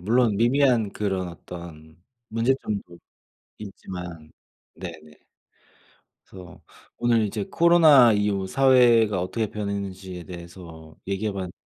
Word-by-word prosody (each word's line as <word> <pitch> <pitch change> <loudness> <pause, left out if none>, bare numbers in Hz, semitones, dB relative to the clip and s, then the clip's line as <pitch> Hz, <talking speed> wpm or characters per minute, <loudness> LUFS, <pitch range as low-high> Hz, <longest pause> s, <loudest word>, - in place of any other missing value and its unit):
물론 115 +2 +2
미미한 120 -2 +2
그런 95 -3 -2
어떤 85 -2 -12 0.3
문제점도 110 -7 -2 0.6
있지만 90 -5 -9 0.4
네네. 80 -4 -11 1.1
그래서 90 -1 -13 0.4
오늘 120 -2 +2
이제 105 0 -4
코로나 160 -8 +6
이후 105 -2 0
사회가 120 -5 +4
어떻게 110 +5 -2
변했는지에 95 -3 -6
대해서 85 -2 -11
얘기해 100 +2 -2
봤는데 95 -2 -6
100 Hz, 255 characters per minute, -24 LUFS, 90-115 Hz, 1.1 s, 코로나